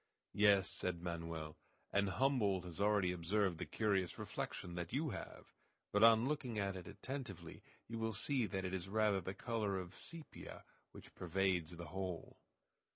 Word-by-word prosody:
"Yes," 100 Hz, -2 st, +6 dB
said 85 Hz, -2 st, -2 dB
Manoel, 85 Hz, -3 st, -4 dB, 0.4 s
"and 100 Hz, 0 st, +3 dB
Humboldt 105 Hz, -4 st, +2 dB
has 90 Hz, +2 st, -6 dB
already 100 Hz, -3 st, +4 dB
observed 90 Hz, 0 st, +1 dB
the -, -, -3 dB
curious 100 Hz, -5 st, +1 dB
reflection 90 Hz, -, -4 dB
that 85 Hz, -1 st, -4 dB
you 145 Hz, +1 st, 0 dB
have; -, -, -8 dB, 0.4 s
but 105 Hz, -, +4 dB
on 115 Hz, +2 st, +8 dB
looking 135 Hz, -6 st, -1 dB
at 100 Hz, -1 st, 0 dB
it 90 Hz, -1 st, -7 dB
attentively 130 Hz, -9 st, -6 dB, 0.3 s
you 115 Hz, 0 st, -4 dB
will 110 Hz, -1 st, -1 dB
see 125 Hz, +1 st, +1 dB
that 95 Hz, -2 st, -2 dB
it 95 Hz, -, -2 dB
is 95 Hz, 0 st, -3 dB
rather 105 Hz, -2 st, +3 dB
the 95 Hz, +2 st, -4 dB
color 110 Hz, -4 st, -1 dB
of 90 Hz, 0 st, -5 dB
sepia 165 Hz, -, -7 dB, 0.3 s
which -, -, -12 dB
pervades 90 Hz, -2 st, +1 dB
the 85 Hz, 0 st, -6 dB
whole." 95 Hz, -1 st, -4 dB
95 Hz, 160 wpm, -39 LUFS, 90-110 Hz, 0.4 s, on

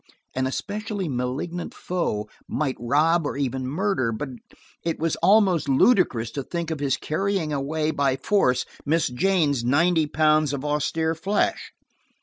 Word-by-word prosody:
An 130 Hz, 0 st, 0 dB
especially 205 Hz, +6 st, -3 dB
malignant 135 Hz, +7 st, -3 dB
foe 135 Hz, -, -2 dB, 0.2 s
might 140 Hz, -4 st, -1 dB
rob, 150 Hz, +6 st, +2 dB
or -, -, -4 dB
even 130 Hz, -2 st, -2 dB
murder, 155 Hz, -, 0 dB
but 130 Hz, +5 st, -4 dB, 0.5 s
it 165 Hz, -1 st, -1 dB
was 165 Hz, 0 st, 0 dB
almost 190 Hz, -3 st, +3 dB
ludicrous 135 Hz, -, +3 dB
to 140 Hz, -, -3 dB
think 170 Hz, +3 st, -4 dB
of 160 Hz, -, -3 dB
his 140 Hz, -2 st, 0 dB
carrying 180 Hz, -1 st, -1 dB
away 150 Hz, +3 st, -1 dB
by 140 Hz, -3 st, +1 dB
force 130 Hz, -4 st, +1 dB, 0.2 s
Miss 160 Hz, +1 st, +1 dB
Jane's 145 Hz, -1 st, +1 dB
ninety 160 Hz, +5 st, +3 dB
pounds 155 Hz, -1 st, +2 dB
of 140 Hz, 0 st, -4 dB
austere 155 Hz, +2 st, 0 dB
flesh. 195 Hz, +6 st, -1 dB
155 Hz, 140 wpm, -24 LUFS, 135-175 Hz, 0.5 s, almost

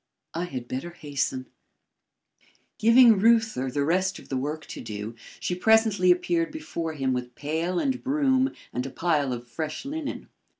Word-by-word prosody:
"I 170 Hz, +2 st, -2 dB
had 130 Hz, -7 st, -6 dB
better 130 Hz, +8 st, -4 dB
hasten." 140 Hz, -5 st, -3 dB, 1.3 s
Giving 230 Hz, -1 st, +7 dB
Reuther 225 Hz, -, +3 dB
the 140 Hz, +2 st, 0 dB
rest 185 Hz, +4 st, +1 dB
of -, -, -14 dB
the 135 Hz, -, -2 dB
work 150 Hz, +4 st, -3 dB
to -, -, -8 dB
do, 105 Hz, +1 st, -6 dB, 0.3 s
she -, -, -2 dB
presently 210 Hz, -1 st, +4 dB
appeared 175 Hz, -2 st, +2 dB
before 170 Hz, -, -4 dB
him 135 Hz, -3 st, 0 dB
with 125 Hz, -1 st, -4 dB
pail 165 Hz, +5 st, -2 dB
and 260 Hz, +4 st, 0 dB
broom 270 Hz, -1 st, +2 dB, 0.2 s
and 125 Hz, -, -1 dB
a -, -, -5 dB
pile 150 Hz, -3 st, 0 dB
of 120 Hz, 0 st, -5 dB
fresh 155 Hz, -, -5 dB
linen. 295 Hz, +1 st, -5 dB
170 Hz, 160 wpm, -26 LUFS, 135-225 Hz, 1.3 s, Giving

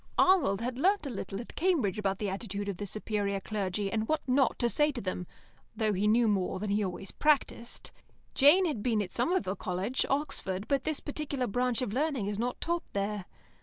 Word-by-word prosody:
Arnold 290 Hz, -, +4 dB
had 250 Hz, +1 st, -3 dB
learnt 385 Hz, +1 st, +3 dB
a 275 Hz, -, -3 dB
little 195 Hz, -2 st, -5 dB
at 235 Hz, -, -11 dB
Cambridge 295 Hz, -, +1 dB
about 195 Hz, -2 st, 0 dB
the 210 Hz, -, -2 dB
attitude 200 Hz, 0 st, -4 dB
of 200 Hz, -3 st, -3 dB
the 205 Hz, -, -4 dB
superior 205 Hz, -1 st, -2 dB
clergy, 195 Hz, -1 st, -2 dB
and 220 Hz, -1 st, -1 dB
what 310 Hz, -2 st, -1 dB
not 260 Hz, -1 st, +3 dB
to 240 Hz, -, +2 dB
say 295 Hz, +5 st, +3 dB
to 265 Hz, -, -5 dB
them, 185 Hz, -3 st, -4 dB, 0.5 s
though 215 Hz, -1 st, +1 dB
he 200 Hz, +2 st, +1 dB
knew 230 Hz, +2 st, +4 dB
more 190 Hz, -3 st, +1 dB
than 205 Hz, 0 st, -2 dB
he 210 Hz, +1 st, +2 dB
always 190 Hz, 0 st, -4 dB
practised. 285 Hz, -5 st, 0 dB, 0.4 s
Jane 305 Hz, +7 st, +6 dB
had 295 Hz, -11 st, -1 dB
been 220 Hz, -2 st, +1 dB
at 180 Hz, -, -8 dB
Somerville 240 Hz, -, 0 dB
College, 185 Hz, +7 st, -1 dB
Oxford, 210 Hz, -9 st, -1 dB
but 275 Hz, -2 st, +1 dB
this 310 Hz, -2 st, 0 dB
particular 290 Hz, -3 st, -2 dB
branch 245 Hz, +3 st, 0 dB
of 210 Hz, -, -3 dB
learning 275 Hz, -4 st, 0 dB
is 205 Hz, 0 st, -2 dB
not 245 Hz, +2 st, -2 dB
taught 340 Hz, 0 st, -2 dB
there. 200 Hz, -1 st, -2 dB
220 Hz, 205 wpm, -30 LUFS, 200-275 Hz, 0.5 s, Jane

